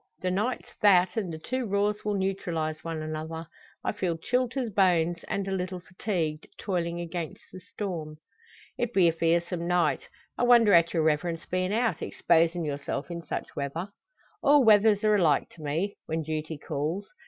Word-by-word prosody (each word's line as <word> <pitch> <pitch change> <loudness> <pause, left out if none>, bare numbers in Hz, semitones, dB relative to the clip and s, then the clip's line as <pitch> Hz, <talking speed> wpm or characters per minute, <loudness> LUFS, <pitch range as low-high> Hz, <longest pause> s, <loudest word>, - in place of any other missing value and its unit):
The 185 - 0
night's 215 +7 -2
that, 190 -2 +5
and 200 -6 -2
the 160 - -5
two 255 +9 -3
raws 205 +1 0
will 210 -1 0
neutralise 170 -5 -2
one 165 -2 -4
another. 160 +1 -5 0.4
I - - 0
feel 180 -5 -2
chilled 250 +8 0
to 265 -2 -1
the 225 - -6
bones, 175 -3 +2
and 195 -1 -2
a - - -2
little 185 -1 -2
fatigued, 175 -4 -3
toiling 175 -3 -2
against 170 -2 -5
the 185 - -8
storm." 170 -5 -5 0.6
"It 240 -1 -2
be 185 -3 +6
a 165 - +3
fearsome 170 +1 0
night. 175 -4 +1 0.3
I - - +2
wonder 235 -4 +6
at 170 0 +5
your 165 -2 +1
Reverence 160 +2 0
bein' 185 +1 -1
out 225 -5 0
exposin' 170 0 +2
yourself 145 +2 -4
in 170 0 -4
such - - -5
weather!" 150 +7 -3 0.5
"All 285 -1 +6
weathers 210 -1 +5
are 215 0 +4
alike 175 -7 +3
to 165 - -15
me 160 +7 -2
when 160 0 -2
duty 155 0 -4
calls. 160 +8 -3
175 Hz, 175 wpm, -28 LUFS, 160-205 Hz, 0.6 s, be